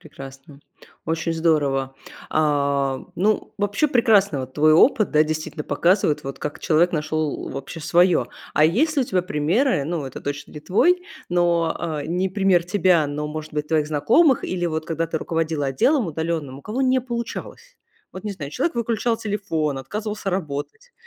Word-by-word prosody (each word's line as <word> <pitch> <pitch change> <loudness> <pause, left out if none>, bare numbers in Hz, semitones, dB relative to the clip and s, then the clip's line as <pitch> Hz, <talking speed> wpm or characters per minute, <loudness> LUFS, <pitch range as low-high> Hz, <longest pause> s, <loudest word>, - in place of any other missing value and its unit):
Прекрасно, 135 -1 -12 0.4
очень 165 +1 -1
здорово! 145 -5 +1 0.4
А, 140 -3 +1 0.2
ну, 210 +4 0
вообще 205 +8 +1
прекрасно, 205 - +3
вот 130 0 -8
твой 155 +1 +4
опыт, 215 - +4
да, 155 0 +5
действительно 155 0 -4
показывает, 170 +1 +1
вот 135 - -6
как 150 - -5
человек 170 +3 +2
нашел, 155 -1 -2
э, - - -7
вообще 135 +5 -7
своё. 170 -5 +3 0.3
А 150 - +5
есть 285 - +2
ли 275 - +4
у - - -2
тебя 185 -5 0
примеры, 175 - +1
ну, 160 -2 -3
это 130 - -8
точно 145 +1 -5
не 150 - -8
твой, 355 - +2 0.3
но, 170 -2 +1 0.3
э, - - -7
не 180 +3 -1
пример 190 -3 +2
тебя, 180 -4 +3
но, 150 +1 -4
может 155 0 -7
быть, 150 0 -3
твоих 155 -2 +1
знакомых, 235 - +3
или 180 -1 -2
вот 160 -1 -2
когда 165 0 -1
ты 160 0 -3
руководила 160 -3 -1
отделом 225 - +2
удаленным, 160 -4 -3
у - - -15
кого 225 +5 -4
не 260 -1 +3
получалось? 240 - -6 0.3
Вот 185 - -10
не 210 - -3
знаю, 145 -6 -7
человек 295 - -1
выключал 230 0 0
телефон, 195 -9 -2
отказывался 210 +7 -4
работать. 185 - -5
165 Hz, 170 wpm, -22 LUFS, 150-205 Hz, 0.4 s, да